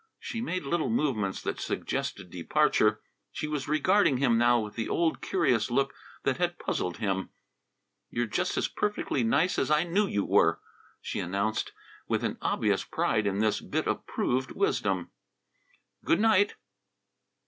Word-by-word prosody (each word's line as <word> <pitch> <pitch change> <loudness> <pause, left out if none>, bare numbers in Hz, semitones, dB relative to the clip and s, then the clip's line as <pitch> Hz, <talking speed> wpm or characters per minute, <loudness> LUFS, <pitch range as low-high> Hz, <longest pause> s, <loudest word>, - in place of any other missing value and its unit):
She 230 - -5
made 185 -8 -2
little 160 +6 0
movements 125 - 0
that - - -3
suggested 90 - -3
departure. 110 - +2 0.3
She 150 - -4
was 150 -2 -3
regarding 155 0 +3
him 125 -3 +3
now 120 +1 +4
with 105 -2 -5
the 115 - -3
old 165 -1 +1
curious 130 - +1
look 135 +3 +1 0.3
that 135 - +1
had 175 0 0
puzzled 90 - -2
him. 95 -2 -1 0.8
"You're 120 0 -1
just 110 - -1
as - - +1
perfectly 205 -10 -1
nice 155 +10 +2
as 135 - 0
I 150 +1 +4
knew 195 +4 +1
you 100 - -1
were," - - +3 0.4
she - - -4
announced, 100 +5 -1 0.4
with - - 0
an - - -2
obvious - - +1
pride 105 -2 0
in 100 +1 0
this 110 -1 +1
bit - - -2
of - - -2
proved 130 +1 -1
wisdom. 405 +1 0 0.9
"Good 325 +1 +2
night!" 205 -2 +4
135 Hz, 155 wpm, -28 LUFS, 110-175 Hz, 0.9 s, now